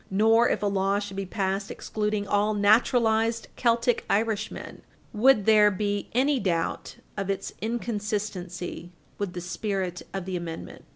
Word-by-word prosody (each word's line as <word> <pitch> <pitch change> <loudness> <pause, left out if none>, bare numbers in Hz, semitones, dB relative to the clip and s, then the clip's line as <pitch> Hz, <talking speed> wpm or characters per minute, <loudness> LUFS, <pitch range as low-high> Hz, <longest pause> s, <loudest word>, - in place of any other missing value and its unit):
Nor, 225 +4 +4
if - - -1
a - - +2
law 195 0 +1
should 205 -1 -5
be 195 -1 -3
passed 195 +1 -2
excluding 210 -1 -2
all 205 +1 +2
naturalized 225 +1 +3
Celtic 235 0 +2
Irishmen, 215 0 -2 0.3
would 225 -1 +4
there 215 -1 +6
be 205 0 -2
any 270 +3 +2
doubt 170 -5 -2 0.2
of 195 -1 -3
its 195 0 -3
inconsistency 205 -6 -4 0.3
with 200 -3 -3
the 175 - -5
spirit 185 0 -3
of 190 -2 -4
the 190 -1 -3
amendment. 170 -2 -7
205 Hz, 140 wpm, -26 LUFS, 190-220 Hz, 0.3 s, there